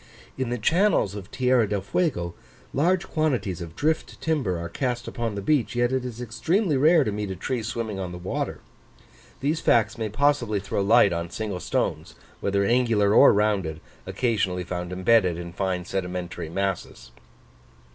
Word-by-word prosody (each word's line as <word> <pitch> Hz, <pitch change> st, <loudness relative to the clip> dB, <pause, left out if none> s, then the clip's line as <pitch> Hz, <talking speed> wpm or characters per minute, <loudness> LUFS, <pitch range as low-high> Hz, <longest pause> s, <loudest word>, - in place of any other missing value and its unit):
In 130 Hz, -2 st, -2 dB
the 120 Hz, -, -1 dB
channels 165 Hz, -, +2 dB
of 100 Hz, -1 st, -8 dB
Tierra 125 Hz, -4 st, +2 dB
del 100 Hz, -1 st, -1 dB
Fuego 95 Hz, -, -1 dB, 0.4 s
large 175 Hz, +5 st, +1 dB
quantities 125 Hz, -, -1 dB
of 85 Hz, -1 st, -8 dB
drift 155 Hz, +1 st, -1 dB
timber 140 Hz, -, 0 dB
are 85 Hz, 0 st, -4 dB
cast 120 Hz, +6 st, -3 dB
upon 115 Hz, -3 st, -3 dB
the 100 Hz, -, -4 dB
beach, 125 Hz, -4 st, +1 dB
yet 120 Hz, 0 st, +2 dB
it 130 Hz, -1 st, 0 dB
is 120 Hz, -2 st, -6 dB
extremely 145 Hz, -, 0 dB
rare 155 Hz, +4 st, +5 dB
to 110 Hz, -, -2 dB
meet 105 Hz, 0 st, -3 dB
a 95 Hz, -, -4 dB
tree 120 Hz, +7 st, -3 dB
swimming 110 Hz, -2 st, -4 dB
on 90 Hz, -2 st, -4 dB
the 90 Hz, -, -7 dB
water. 90 Hz, +1 st, -4 dB, 0.8 s
These 150 Hz, +4 st, 0 dB
facts 115 Hz, 0 st, +2 dB
may 110 Hz, -1 st, -2 dB
possibly 120 Hz, -3 st, +1 dB
throw 100 Hz, +1 st, -2 dB
light 100 Hz, -2 st, +5 dB
on 85 Hz, 0 st, -3 dB
single 100 Hz, 0 st, -4 dB
stones, -, -, -2 dB, 0.2 s
whether 100 Hz, 0 st, +1 dB
angular 115 Hz, -3 st, +3 dB
or -, -, +8 dB
rounded, 100 Hz, -7 st, 0 dB, 0.3 s
occasionally 100 Hz, -7 st, 0 dB
found 90 Hz, 0 st, -5 dB
embedded 95 Hz, -1 st, +3 dB
in 85 Hz, 0 st, -7 dB
fine 90 Hz, -1 st, -2 dB
sedimentary 90 Hz, -3 st, -4 dB
masses. 95 Hz, -7 st, -3 dB
105 Hz, 165 wpm, -25 LUFS, 95-125 Hz, 0.8 s, or